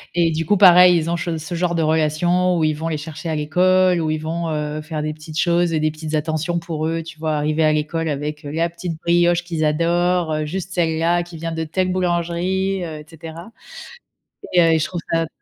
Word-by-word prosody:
et 170 -1 +3
du 165 +1 -2
coup 205 +6 +2
pareil 180 -2 +7
ils 165 0 -1
ont 170 - 0
che 165 0 -3
ce 160 +2 -6
genre 175 0 0
de 165 - +1
relation 160 +4 +1
où 165 - +1
ils 155 - +2
vont 160 +2 -4
les 155 - -2
chercher 155 +2 -7
à 160 - -1
l'école, 180 +4 +2
où 160 - -1
ils 155 - 0
vont, 165 +2 -3
heu, 150 0 -3
faire 155 0 -5
des 155 0 -2
petites 155 +1 -7
choses 175 -1 +2
et 160 - +1
des 155 0 +1
petites 155 0 -7
attentions 160 +3 -1
pour 160 -2 -3
eux, 165 0 -2
tu 160 -1 -12
vois? 155 -1 -1
Arriver 155 +2 0
à 155 - +4
l'école 155 +2 -1
avec, 150 +1 -4
heu, - - -5
la 165 +2 0
petite 170 -1 -6
brioche 175 0 +2
qu'ils 165 -3 -2
adorent, 170 +2 +1
heu, 155 0 -1
juste 180 +3 -5
celle-là, 170 0 +1
qui 170 -1 -11
vient 165 +1 -4
de 160 0 -2
telle 185 +4 -1
boulangerie, 180 +2 -1
heu, 160 -2 -6
et 150 - -12
cetera, 165 +4 -10 1.0
et 175 - +6
heu, 165 -1 +4
et 160 - +3
je 155 - 0
trouve 175 -2 -5
ça 165 0 +1
165 Hz, 235 wpm, -20 LUFS, 155-175 Hz, 1.0 s, pareil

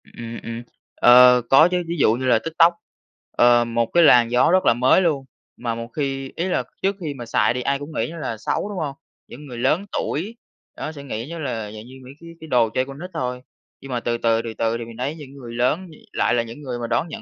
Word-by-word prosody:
Ừm, - - -22
ừm, 115 -1 -7
ừm. 115 0 -6 0.3
Ờ, 125 0 +7
có 145 +5 +7
chứ 180 -1 0
ví 170 +1 -3
dụ 110 - +4
như 130 +3 -3
là 120 -3 +4
TikTok, 165 +4 +3 0.6
ờ, 120 0 +4
một 115 0 0
cái 170 - +5
làn 120 -6 +6
gió 125 +6 +4
rất 185 +1 +3
là - - +5
mới 125 +9 +4
luôn. 150 -7 0 0.3
Mà 120 -2 -3
một 115 0 -6
khi 135 0 -4
ý 170 - -2
là 185 - 0 0.2
trước 195 +1 +1
khi 155 -5 -4
mà 120 -3 -8
xài 115 - +2
thì 125 - -3
ai 140 +2 0
cũng 145 +2 -8
nghĩ - - -1
nó 170 - -9
là 120 -8 -4
xấu, 195 - -2
đúng 205 - -6
hông? 145 -4 -3 0.3
Những 145 +5 -11
người 125 -4 -9
lớn 150 +10 +1
tuổi 195 +10 -3 0.4
đó - - -5
sẽ 145 -3 -10
nghĩ 120 -3 -5
như 170 +1 -7
là 115 -8 -4
dạng 110 +1 -10
như 130 +1 -13
mấy 130 - -11
cái 170 - -12
cái 160 - -9
đồ 120 -5 +3
chơi 130 +4 -1
con 135 +1 -10
nít 180 +2 -7
thôi. 125 0 -3 0.4
Nhưng 135 - -9
mà 120 - -1
từ, 120 0 -2
từ, 115 -1 +1
từ, 115 -1 -6
từ, 115 +1 -1
thì 120 - -6
mình 115 0 -12
thấy 135 +5 -3
những 145 -4 -11
người 125 -4 -10
lớn 130 +10 0 0.3
lại - - +1
là 120 -1 +2
những 115 +5 -10
người 125 -4 -5
mà 120 - -4
đón 120 +7 0
nhận 225 +6 -8
130 Hz, 265 wpm, -22 LUFS, 120-155 Hz, 0.6 s, Ờ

